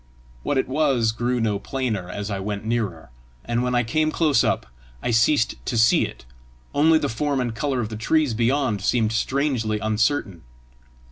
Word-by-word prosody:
What 145 - -1
it 130 - +1
was 130 -5 +2
grew 120 +2 -1
no 105 -3 0
plainer 110 -7 -3
as 100 +2 -5
I 100 - -2
went 100 +1 -4
nearer, 105 - -2 0.3
and 120 0 0
when 125 0 0
I 120 - +3
came 155 +7 +1
close 155 -7 +2
up, - - 0 0.4
I 120 - 0
ceased 115 +2 +2
to 120 - -1
see 115 -1 +4
it, - - -13 0.5
only 160 +2 +5
the 145 - -1
form 140 +3 -1
and 120 -2 -1
colour 130 +2 -1
of 110 - -3
the 110 - -6
trees 150 +3 +1
beyond 120 -2 +1
seemed 110 +1 +1
strangely 120 -2 0
uncertain. 110 - 0
120 Hz, 180 wpm, -23 LUFS, 110-135 Hz, 0.5 s, only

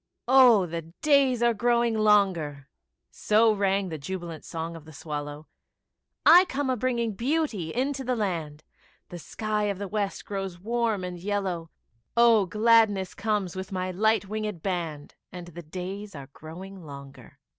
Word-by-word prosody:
Oh, 245 -6 +6
the 170 0 -4 0.2
days 275 -5 +4
are 235 0 +4
growing 235 +1 +1
longer; 190 -10 +2 0.4
So 220 +1 +3
rang 195 -1 0
the 160 -2 -5
jubilant 170 0 -6
song 165 0 -5
of 160 -2 -11
the 155 - -13
swallow; 145 0 -6 0.8
I 355 +3 +8
come 280 -5 -2
a - - +1
bringing 235 -2 -1
beauty 240 - -1
into 270 +2 -2
the 250 0 -1
land, 165 -8 -3 0.5
The 175 - -8
sky 210 +7 -2
of 200 -2 -1
the 200 +1 -5
West 205 0 -3
grows 195 -3 -4
warm 225 -1 -1
and 180 -1 -5
yellow, 185 -4 -3 0.5
Oh, 230 -4 +5
gladness 215 -2 +3
comes 205 -5 -2
with 190 +1 -6
my 185 -1 -2
light 220 +3 +2
winged 210 -4 -4
band, 165 -6 -4 0.2
And 175 -1 -9
the 175 0 -9
days 185 +4 -7
are 140 -1 -9
growing 185 +4 -10
longer. 140 -4 -12
195 Hz, 155 wpm, -26 LUFS, 170-225 Hz, 0.8 s, I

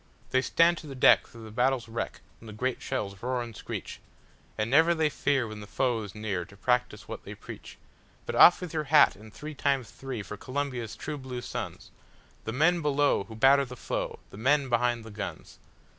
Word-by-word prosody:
They 130 - +3
stand 170 +4 +3
to 155 - -11
the 135 - -7
deck 130 - +6
through 115 -1 -13
the 110 - -9
battle's 125 +1 +1
wreck 115 +1 -4 0.2
when 115 - -13
the 110 - -8
great 125 +4 -2
shells 100 -7 -4
roar 125 0 -1
and 115 -2 -9
screech—And 110 +2 -7
never 160 +7 +5
they 160 -2 +2
fear 135 -4 0
when 110 -1 -8
the 105 - -9
foe 120 0 0
is 100 -2 -8
near 105 -4 -2
to 100 +3 -16
practice 125 -2 0
what - - -7
they - - -8
preach:But - - -11
off 175 - +8
with 180 -3 -6
your 155 -1 -1
hat 150 +1 +6
and 110 +2 -14
three 150 +7 -8
times 135 -5 0
three 130 -6 -6
for 105 +2 -8
Columbia's 130 -2 -3
true 150 -1 -5
blue 130 -2 -6
sons, - - -6 0.5
The 110 - -2
men 165 +7 +3
below 145 -7 +2
who 110 - -10
batter 135 +4 +5
the 125 -1 -8
foe—the 95 - -5
men 135 +4 +2
behind 120 -1 +1
the 110 - -9
guns! 105 0 -7
125 Hz, 200 wpm, -28 LUFS, 110-140 Hz, 0.5 s, off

